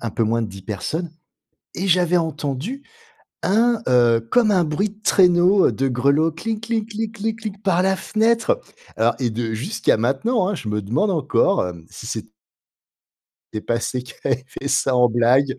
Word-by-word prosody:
un 115 - -4
peu 115 - -1
moins 115 +1 +1
de 110 - -3
10 100 -1 -11
personnes 150 - -4 0.7
et 190 +3 -2
j'avais 180 -1 +3
entendu 160 - -3 0.6
un, 230 +4 +2
heu, 120 -2 +4
comme 235 -3 +4
un 185 -3 +3
bruit 165 +7 -1
de 210 +2 -20
traîneau, 180 +1 +4
heu, - - +1
de 135 - -1
grelots: 140 +6 +2
«clic 215 +7 -4
kling 225 -2 -1
clic 220 0 -4
clic 220 +1 -3
clic», 210 -3 -7
par 180 -3 +2
la 190 0 +2
fenêtre. 225 +3 +1 0.4
Alors 115 +2 +2
et 125 -3 0
de 115 0 -3
jusqu'à 135 - 0
maintenant, 140 - 0
hein, 205 - -1
je 110 - -6
me 105 0 -1
demande 120 - 0
encore, 170 +4 +2
heu, 85 -2 -5
si - - -11
c'est 110 -1 -4 1.3
était 110 - -3
passé 115 +3 -2
et - - -7
qui 125 - -12
avait 130 -1 0
fait 135 +1 -6
ça 135 -1 +1
en 125 0 +5
blague, 130 +4 +2
155 Hz, 190 wpm, -21 LUFS, -, 1.3 s, en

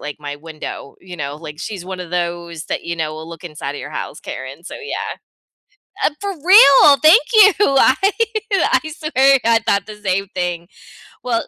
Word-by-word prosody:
like, 150 0 -7
my 145 -1 -6
window, 155 -2 -9
you 180 -1 -11
know, 145 -2 -5
like, 150 -1 -10
she's 190 -2 -6
one 185 0 -7
of 175 -2 -8
those 170 -2 -4
that, - - -4
you 170 0 -4
know, 155 -1 -3
will 160 +1 -9
look 165 +1 -11
inside 150 -4 -6
of - - -7
your - - -8
house, - - -6
Karen, 130 +6 -8
so, - - -8
yeah. 440 - -6 0.9
Uh, - - +3
for 400 0 -3
real, 290 -7 +7
thank 330 +10 +7
you. 420 -2 +7 0.3
I 260 - +5 0.6
I 390 - +2
swear 275 -3 +2
I 230 0 +4
thought 200 - +1
the 215 -1 -9
same 195 -1 -2
thing. 175 -1 -3 0.6
Well 235 -2 -2
180 Hz, 190 wpm, -18 LUFS, 160-260 Hz, 0.9 s, real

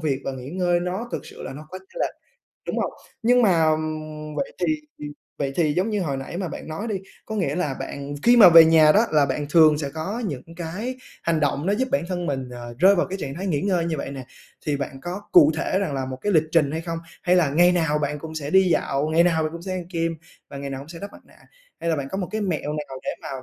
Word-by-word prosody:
việc 145 -4 -1
và 135 - -2
nghỉ 130 +1 -8
ngơi 175 0 +1
nó 185 +7 -3
thực - - -4
sự - - -11
là - - -6
nó 150 +3 -10
có 185 - -6
chênh 190 - -11
lệch. - - -1 0.5
Đúng - - -2
hông? - - -1 0.3
Nhưng 245 +2 +4
mà, 165 -6 +4
ừm, 155 -1 -4
vậy 275 - -2
thì - - 0 0.3
thì - - -8 0.3
vậy 140 -2 -1
thì 155 -4 +2
giống 185 +8 0
như 210 - 0
hồi 140 -5 -2
nãy 135 +5 -6
mà 185 -2 -3
bạn 150 - -8
nói 180 +8 -4
đi, 210 - -1 0.3
có 220 - -5
nghĩa 160 -8 0
là 150 -7 -1
bạn 140 +1 -5
khi 240 +1 +6
mà 210 -6 +10
về 165 -1 +10
nhà 160 -1 +6
đó 225 +3 +4
là 145 -2 +4
bạn 145 +2 -2
thường 155 -2 +6
sẽ 140 -2 -3
có 195 +10 -3
những 140 -7 -4
cái 195 +10 -4 0.3
hành 165 -2 +1
động 145 +1 0
nó 195 - +2
giúp 260 +4 -1
bản 280 - +2
thân 175 -2 -2
mình, 135 -3 -2
ờ, 120 -1 -8
rơi 190 +5 +6
vào 175 - +2
cái 195 +1 -5
trạng 140 -4 -5
thái 190 +4 -5
nghỉ 150 -6 0
ngơi 180 -4 +1
như 160 -2 -1
vậy 140 - -5
nè, 135 -3 -7 0.4
thì 145 -2 +1
bạn 135 -1 -5
có 180 +3 -5
cụ 150 +1 +7
thể 185 +3 0
rằng 195 -8 -2
là 130 -1 -2
một 130 - -5
cái 205 - 0
lịch 160 -2 +4
trình 150 -4 +3
hay 160 - -2
không, 165 0 -4 0.2
hay 180 0 +3
là 165 -6 +3
ngày 175 +5 +5
nào 160 -4 +1
bạn 150 0 -2
cũng 160 +1 -8
sẽ 145 -2 -4
đi 190 0 +5
dạo, 140 -1 +1
ngày 165 +2 +4
nào 165 -2 +2
bạn 155 0 -2
cũng 170 0 -8
sẽ 190 - -4
ăn 180 -2 -4
kem 165 -1 -1 0.3
và 140 - -7
ngày 140 0 -5
nào 135 - -5
cũng 140 - -11
sẽ 165 0 -9
đắp 200 +2 -8
mặt - - -14
nạ, - - -22 0.4
hay 170 - -1
là 160 - +1
bạn 135 -1 -4
có 190 - -3
một 185 - -3
cái 220 - -2
mẹo 160 -6 -2
nào 150 -3 -5
để - - -2
mà - - -6
160 Hz, 285 wpm, -23 LUFS, 145-185 Hz, 0.5 s, mà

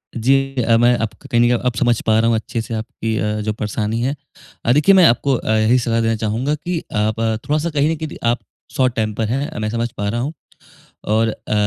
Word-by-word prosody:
जी। 125 +3 +2 0.3
अ, 115 0 +4
मैं 120 +1 +4
आपको 115 +5 -5
कहीं 120 -2 +3
न - - +6
कहीं 120 0 +3
अब 125 - -8
समझ 120 +2 +2
पा 110 0 +3
रहा 115 - +2
हूँ 115 - +3
अच्छे 115 +1 -3
से 115 +1 -7
आपकी 110 0 -3
अ, 105 0 -1
जो 105 0 -2
परेशानी 105 +1 -2
है। 135 +4 -1 0.5
अ, 120 - +3
देखिए 175 +7 +5
मैं 185 - +7
आपको 135 +2 +3
अ, - - -5
यही 110 +4 +3
सलाह 115 -1 0
देना 115 0 +1
चाहूँगा 120 +8 0
कि 170 +2 -3
आप 105 +1 0
अ, 110 -1 0
थोड़ा-सा 155 +3 0
कहीं 150 0 +1
न 165 - 0
कहीं 155 - -8
आप 120 - +1 0.4
शॉर्ट 130 -2 +2
टेंपर 110 0 -1
है 135 0 -3
मैं 110 - -2
समझ 115 +1 -2
पा 100 - -2
रहा 120 - -2
हूँ। 145 +5 -3 0.7
और 110 +2 +2
अ, 110 - -5
115 Hz, 235 wpm, -19 LUFS, 110-130 Hz, 0.7 s, मैं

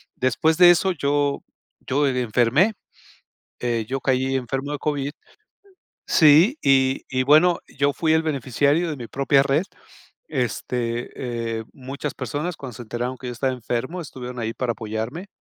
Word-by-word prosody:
después 140 +6 +1
de 175 -1 +9
eso 175 +2 +2
yo 145 -3 0 0.5
yo 145 +3 +2
e 125 -2 0
enfermé, 125 - +2 0.9
eh, 115 -3 -1
yo 135 +1 -2
caí 130 +1 +1
enfermo 135 +3 -3
de 145 - -3
COVID 145 -1 -2 1.0
sí. 165 - +6
Y 135 -1 +3
y 130 -1 0
bueno, 155 +6 +5
yo 140 +1 0
fui 160 +1 +1
el 160 0 +3
beneficiario 145 +3 +1
de 155 - -3
mi 120 -4 -8
propia 140 +1 +2
red, 140 +4 +1 0.6
este, 120 -2 -2 0.5
eh, - - -6
muchas 135 +2 -6
personas, 145 +7 -4
cuando 130 -4 -8
se 120 - -8
enteraron 120 +3 -4
que 125 - -8
yo 125 - -4
estaba 130 +2 -1
enfermo, 125 +8 -3
estuvieron 125 -5 -8
ahí 115 -1 -2
para 120 -1 -2
apoyarme. 115 - -5
135 Hz, 155 wpm, -23 LUFS, 125-150 Hz, 1.0 s, de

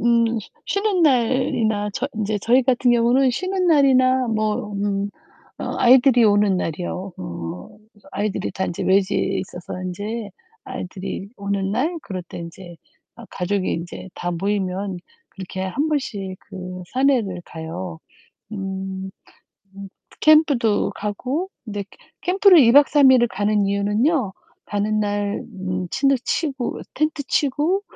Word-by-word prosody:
음 235 0 +4 0.4
쉬는 400 -3 +1
날이나 235 -6 +2
저 265 - -2
인제 215 -1 -1
저희 250 +5 +4
같은 245 0 +2
경우는 245 +3 +4
쉬는 370 +8 -1
날이나 260 -5 +4
뭐 215 -1 -1
음 200 0 -1 0.5
어 - - -4
아이들이 250 0 +6
오는 205 -2 +3
날이요. 180 +3 -4
어. 85 -1 -6 0.2
그래서 205 -2 -21
아이들이 205 -1 -2
다 190 0 -2
인제 170 - -4
외지에 195 0 +2
있어서 180 0 -7
인제 205 +4 -4 0.4
아이들이 190 +1 -6
오는 200 -1 -1
날 305 +10 0
그럴 185 -2 -5
때 - - -11
인제 170 +1 -9 0.4
아 235 - -11
가족이 190 +1 -1
인제 175 +2 -6
다 175 0 -3
모이면 190 0 -2 0.3
그렇게 190 0 -6
1 280 +12 -1
번씩 205 -11 -3
그 185 -2 -8
산에를 250 -9 +1
가요. 165 +1 -7 0.5
음. 190 -1 -5 0.7
음, 200 0 -8 0.3
캠프도 285 -9 +4
가고 255 - -3 0.2
근데 205 -2 -4
캐 - - -19 0.2
캠프를 375 -1 +6
2 235 -3 +6
박 285 +2 +7
3 280 -3 +6
일을 245 -2 +5
가는 210 -2 +1
이유는요. 205 - +1 0.3
가는 210 +1 -1
날 205 -1 -1
음 185 -1 -3
침대 275 +4 +2
치고 275 -6 -2
텐트 305 -2 -1
치고 300 +9 +1
205 Hz, 255 characters per minute, -22 LUFS, 190-260 Hz, 0.7 s, 박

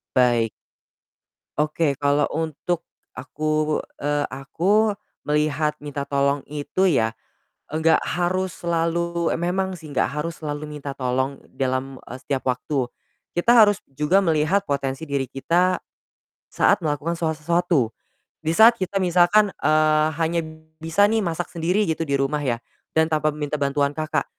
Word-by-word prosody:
Baik. 120 -3 +3 1.1
Oke, 150 -1 +1
kalau 145 0 +2
untuk 160 +2 -3 0.3
aku 155 0 -1 0.2
eee, 145 0 0
aku, 190 +11 +1 0.3
melihat 150 0 +1
minta 145 -1 -4
tolong 140 0 +1
itu 150 +6 0
ya, 115 -8 +1 0.6
enggak 160 +1 +3
harus 180 +1 -1
selalu 170 0 0
memang 185 +2 -1
sih 155 -3 -11
enggak - - +1
harus 155 +3 -4
selalu 150 -1 -4
minta 145 -2 -6
tolong 130 +1 -2
dalam, 130 0 -2
eee, 130 - -6
setiap 135 -1 -3
waktu. 125 +1 -1 0.5
Kita 175 +8 +3
harus 205 -1 +1
juga 150 +8 +2
melihat 165 +3 +2
potensi 140 +1 -2
diri 140 -2 -1
kita 175 +7 +1 0.7
saat - - +3
melakukan 150 +3 -1
so 165 -1 0
sesuatu. 165 -6 +1 0.5
Di 160 +1 0
saat 230 +5 +7
kita 190 +1 -1
misalkan, 185 +4 +4
eee, 155 0 +3
hanya 165 +1 +1 0.4
bisa 165 +6 +3
nih 225 - +2
masak 170 +1 -2
sendiri 175 +5 +1
gitu 160 0 -1
di 140 - -2
rumah 135 +2 0
ya, 120 -4 -1 0.3
dan 160 0 +3
tanpa 155 -1 +1
minta 150 0 -3
bantuan 140 0 +1
kakak. 155 +1 -2
155 Hz, 140 wpm, -23 LUFS, 140-170 Hz, 1.1 s, saat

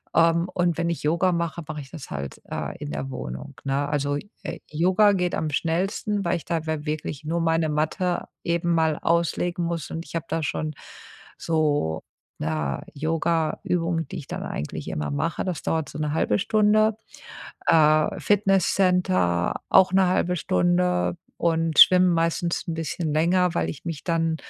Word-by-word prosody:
Ähm, 165 +1 +4
und 175 -3 +1
wenn 170 0 0
ich 170 - -3
Yoga 170 +4 +2
mache, 170 -1 -2
mach 150 -1 -5
ich 135 -2 -10
das 160 -5 -9
halt, 70 -1 -6
äh, - - -4
in 70 - -6
der 70 -2 -4
Wohnung, 65 - -7
ne? 140 +2 0
Also, 145 -1 0 0.3
äh, - - -5
Yoga 185 +6 +4
geht 180 -3 0
am 155 - -1
schnellsten, 195 +7 -1
weil 175 0 +1
ich - - -11
dabei 160 -2 -2
wirklich 150 -1 -4
nur 170 +2 -1
meine 165 -1 +2
Matte 160 +4 -1 0.2
eben 170 0 +1
mal 160 -2 +2
auslegen 170 +1 0
muss 170 -3 -3
und 165 +1 -5
ich - - -10
habe 165 - -2
da 165 - -1
schon, 155 +2 -2 0.6
so, 145 - 0 0.4
na, 75 -3 -2
Yogaübungen, 165 +2 -1
die - - -6
ich 145 - -8
dann - - -5
eigentlich 75 - -5
immer 75 -1 -3
mache. 70 - -1
Das 180 -5 -3
dauert 160 -3 -1
so 150 - -8
1/2 150 -8 +1
Stunde. 215 0 +3 0.7
Äh, 155 -1 +4
Fitnesscenter 185 - +2
auch 185 0 +5
1/2 180 -1 +3
Stunde 90 - +1 0.2
und 165 -2 +1
schwimmen 185 0 +8
meistens 170 +1 0
'n 165 - -2
bisschen 160 0 -3
länger, 175 +2 +2
weil - - 0
ich 150 - -8
mich 165 -4 -5
dann 165 -2 0
165 Hz, 160 wpm, -24 LUFS, 150-175 Hz, 0.7 s, schwimmen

